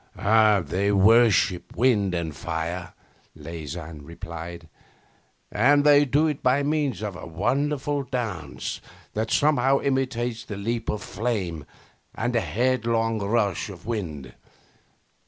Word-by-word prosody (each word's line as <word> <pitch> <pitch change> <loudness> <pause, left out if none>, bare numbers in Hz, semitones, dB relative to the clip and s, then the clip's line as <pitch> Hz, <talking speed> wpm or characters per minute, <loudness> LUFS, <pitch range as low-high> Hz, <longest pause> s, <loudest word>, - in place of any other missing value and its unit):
'They 100 -2 +3
worship 105 -1 +4
wind 105 -6 +2
and 80 -3 -3
fire,' 85 +3 -4 0.4
Leysin 80 -1 -7
replied, 85 +1 -8 0.8
'and 145 +7 +4
they 145 0 +6
do 145 +4 +2
it 150 -3 -1
by 130 +3 +2
means 145 - -1
of 100 -3 -4
a 90 - -8
wonderful 140 - -1
dance 115 - -4 0.3
that 110 +1 -2
somehow 140 -2 +3
imitates 125 -4 -1
the 105 -4 -7
leap 115 +3 -3
of 105 - -2
flame 95 - -3 0.5
and 120 +2 -1
the 115 - +2
headlong 115 -2 0
rush 100 -1 0
of 95 -2 -11
wind. 80 - -4
110 Hz, 120 wpm, -25 LUFS, 90-125 Hz, 0.8 s, they